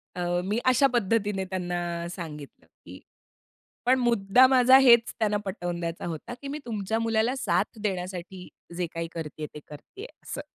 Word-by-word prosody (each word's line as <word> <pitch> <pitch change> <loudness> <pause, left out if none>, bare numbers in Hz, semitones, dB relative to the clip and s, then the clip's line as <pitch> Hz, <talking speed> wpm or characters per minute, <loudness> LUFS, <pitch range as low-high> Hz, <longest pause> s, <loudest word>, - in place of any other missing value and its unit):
अ, 180 - -4 0.2
मी 210 +4 0
अशा 255 +2 +5
पद्धतीने 205 -3 0
त्यांना 175 -2 -3
सांगितलं, 150 -5 -9 0.2
की - - -11 0.9
पण 260 +1 +4
मुद्दा 235 0 +4
माझा 260 0 +6
हेच 235 -3 +5
त्यांना 210 -2 +1
पटवून 175 -3 -4
द्यायचा 170 0 -4
होता, 165 +8 -6
की 280 - -7
मी 290 +2 -4
तुमच्या 220 -1 -2
मुलाला 225 +2 +1
साथ 260 -3 -1
देण्यासाठी 185 -2 -4 0.3
जे 180 -1 -1
काही 165 0 -3
करतीये 155 -2 -6
ते - - -8
करतीये 370 - -11 0.2
असं. - - -6
195 Hz, 155 wpm, -26 LUFS, 175-240 Hz, 0.9 s, माझा